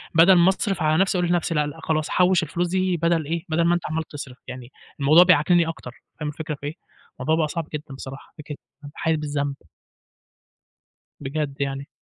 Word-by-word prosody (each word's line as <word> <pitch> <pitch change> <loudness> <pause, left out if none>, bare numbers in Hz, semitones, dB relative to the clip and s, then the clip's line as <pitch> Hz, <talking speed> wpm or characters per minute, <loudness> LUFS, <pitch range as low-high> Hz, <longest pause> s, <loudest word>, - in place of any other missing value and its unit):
بَدَل 170 +4 +7
ما 175 +1 +5
أصرف 195 -2 -1
على 155 0 +2
نَفْسي 195 -1 +1
أقول 175 -1 0
لنَفْسي 175 -1 0
لأ، 150 - +2
لأ 155 +3 -8
خلاص، 155 -1 -1
حوِّش 180 -1 +3
الفلوس 175 +3 -2
دي 185 0 0
بَدَل 165 -1 +1
إيه، 165 +2 -3
بَدَل 160 +2 +1
ما 170 - +4
أنت 175 - -3
عَمّال 160 +1 -1
تصرف. 140 -4 -9
يعني 125 -2 -8 0.3
الموضوع 155 +6 +7
بيعكننّي 175 -1 +4
أكتر، 160 -6 -6 0.3
فاهم 150 -1 -3
الفكرة 150 0 -5
في 140 - -11
إيه، 150 - -4 0.5
الموضوع 160 - +1
بقى 160 -1 +1
صعب 165 0 -4
جدًا 150 -2 -6
بصراحة، 135 +1 -10
فكرة 150 -1 -8 0.2
بابقى 145 +1 -12
حاسس 160 -1 +1
بالذنب. 145 -2 -2 1.6
بجد 140 0 -4
يعني. 140 +1 -3
160 Hz, 195 wpm, -23 LUFS, 145-170 Hz, 1.6 s, بَدَل